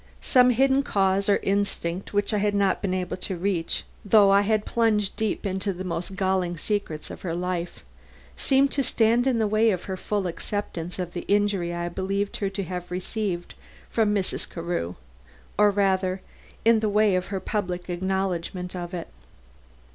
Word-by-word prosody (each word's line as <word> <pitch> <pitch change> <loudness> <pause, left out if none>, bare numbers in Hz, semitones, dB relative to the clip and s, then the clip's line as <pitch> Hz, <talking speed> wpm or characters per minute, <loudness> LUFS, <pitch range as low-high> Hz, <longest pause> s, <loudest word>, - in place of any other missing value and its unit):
Some 250 -1 +5
hidden 265 +3 +4
cause 195 -5 +1
or 200 - +5
instinct 195 -3 -1
which 205 +2 +1
I 210 - +2
had 205 0 +1
not 200 -1 +2
been 185 -2 0
able 180 -1 -3
to 185 0 -1
reach, 175 -2 0 0.2
though 205 -1 +6
I 200 0 +6
had 215 +1 +1
plunged 215 -4 +1
deep 220 -1 -2
into 190 +1 -1
the 185 +1 -6
most 180 +1 -4
galling 185 -2 0
secrets 185 -5 -3
of - - -9
her 170 -3 -3
life, 180 -1 -3 0.5
seemed 275 0 +3
to 280 - +1
stand 235 0 +2
in 255 -3 +2
the 220 - +2
way 215 +2 +3
of 185 -4 -1
her 190 -1 -4
full 205 +1 -2
acceptance 175 -1 -4
of 180 -2 -4
the 175 - -3
injury 200 -4 +1
I 175 0 -3
believed 195 +3 -2
her 200 - -1
to 195 0 -3
have 180 0 -5
received 180 0 -3 0.4
from 220 -2 +2
Mrs. 200 -3 -1
Carew; 165 - -3 0.6
or 210 0 +5
rather, 190 -2 +1 0.4
in 230 -1 +6
the 215 -1 0
way 210 -1 +3
of 180 0 -1
her 195 -1 -3
public 185 -3 -3
acknowledgment 180 0 -2
of 175 0 -5
it. 170 - -5
195 Hz, 180 wpm, -25 LUFS, 180-210 Hz, 0.6 s, though